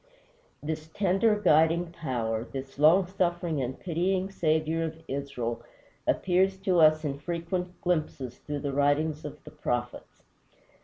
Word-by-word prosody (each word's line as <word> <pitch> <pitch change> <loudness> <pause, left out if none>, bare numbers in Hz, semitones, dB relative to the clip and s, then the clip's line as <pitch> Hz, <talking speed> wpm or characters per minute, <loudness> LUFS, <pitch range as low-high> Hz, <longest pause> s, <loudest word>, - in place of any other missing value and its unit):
This 155 +1 -4
tender, 205 +2 +2
guiding 165 -1 +3
Power, 115 -8 -2
this 135 +2 -8
long 165 +6 +6
suffering 175 -4 -1
and 130 +1 -4
pitying 185 +2 0
Saviour 160 -2 +1
of 160 0 -4
Israel, 135 -4 -3 0.5
appears 190 +1 +2
to 185 -3 +2
us 155 0 +5
in 140 -1 -3
frequent 175 +3 -3
glimpses 155 -8 -2
through 145 -1 -5
the 140 -2 -2
writings 145 +2 +1
of 150 0 -8
the - - -11
prophets. 120 -5 -4
155 Hz, 135 wpm, -28 LUFS, 140-175 Hz, 0.5 s, long